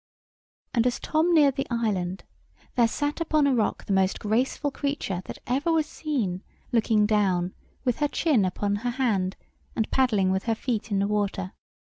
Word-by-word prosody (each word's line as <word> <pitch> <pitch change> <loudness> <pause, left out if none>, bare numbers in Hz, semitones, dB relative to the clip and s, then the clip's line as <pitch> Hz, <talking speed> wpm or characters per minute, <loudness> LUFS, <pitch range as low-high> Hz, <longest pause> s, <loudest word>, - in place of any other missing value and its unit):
And 235 0 +3
as 245 - -1
Tom 320 +3 +1
neared 290 -5 +5
the 275 - -1
island, 200 -6 -1 0.5
there 235 -2 +4
sat 290 +7 -2
upon 310 -2 +2
a 280 - +3
rock 225 -4 0
the 200 - -1
most 190 0 +2
graceful 250 +7 0
creature 275 -10 -2
that - - -7
ever 275 +7 0
was 320 -2 +2
seen, 250 - -2 0.3
looking 220 -2 +3
down, 190 -4 +1 0.3
with 250 -2 +1
her 295 - +2
chin 290 - +2
upon 200 +2 -1
her 245 +4 -2
hand, 220 -7 0 0.4
and 220 - -1
paddling 215 -8 +3
with 190 0 -1
her 225 -1 +1
feet 225 -2 -2
in 200 - 0
the 200 +1 +1
water. 200 -3 -1
225 Hz, 175 wpm, -26 LUFS, 200-275 Hz, 0.5 s, neared